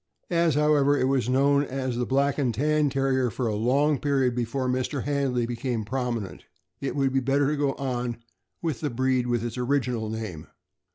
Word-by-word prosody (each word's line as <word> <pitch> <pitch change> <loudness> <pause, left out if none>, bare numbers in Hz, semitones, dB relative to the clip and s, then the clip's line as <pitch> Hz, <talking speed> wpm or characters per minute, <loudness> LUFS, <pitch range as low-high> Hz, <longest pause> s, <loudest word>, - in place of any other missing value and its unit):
As, 170 -3 +2
however, 145 -1 +3
it - - +1
was 130 -2 +1
known 140 +2 +3
as 130 -2 -3
the 125 0 -1
Black 140 +2 +1
and 130 -4 +1
Tan 150 +3 +2
Terrier 135 -2 +1
for 120 +4 -3
a 110 - 0
long 135 +7 +2
period 135 -3 +1
before 125 +2 -1
Mr. 130 +1 -1
Handley 135 -4 0
became 120 -2 -3
prominent, 120 -4 -3 0.4
it 135 0 -3
would 135 -2 +1
be 135 - +3
better 135 +2 +1
to - - 0
go 140 -2 0
on 125 -3 -3 0.5
with 160 -4 -1
the 150 - -1
breed 130 0 0
with 120 -2 0
its 120 +1 -4
original 125 -4 0
name. 110 -8 -6
130 Hz, 185 wpm, -26 LUFS, 120-140 Hz, 0.5 s, however